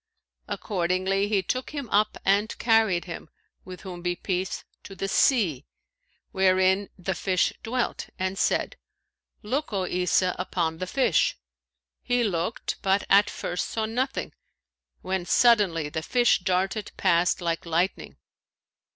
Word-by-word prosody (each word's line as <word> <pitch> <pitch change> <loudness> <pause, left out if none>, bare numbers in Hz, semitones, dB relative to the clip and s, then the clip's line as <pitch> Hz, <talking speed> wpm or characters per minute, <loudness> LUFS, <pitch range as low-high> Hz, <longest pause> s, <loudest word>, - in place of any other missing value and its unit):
Accordingly, 190 +1 0
he 205 -2 +1
took 255 +7 -2
him 280 -4 -4
up 210 +1 +2
and 200 +3 +2
carried 220 -7 +3
him 170 -3 -8 0.3
(with 185 -1 -10
whom 180 -3 -8
be 175 0 -1
peace!) 185 +1 -3 0.2
to 195 - -11
the 195 +1 -3
sea, 190 - +2 0.6
wherein 190 +1 +3
the 190 +1 -2
fish 185 0 +1
dwelt, 245 +2 -2
and 185 +1 -2
said, - - 0 0.7
'Look, 270 +8 -2
O 195 -3 -1
Isa, 180 0 +1
upon 165 -3 -2
the 185 - -3
fish.' 255 - +2 0.6
He 245 0 +1
looked 185 0 -2
but 195 +1 +2
at 205 +1 +6
first 175 - -3
saw 220 -1 -2
nothing, 255 +5 -2 0.7
when, 190 -1 -1
suddenly, 200 -10 +4
the 155 +2 -4
fish 240 +7 +3
darted 190 +3 -1
past 175 -2 +2
like 170 -1 -2
lightning. 170 +3 -1
190 Hz, 135 wpm, -26 LUFS, 180-215 Hz, 0.7 s, at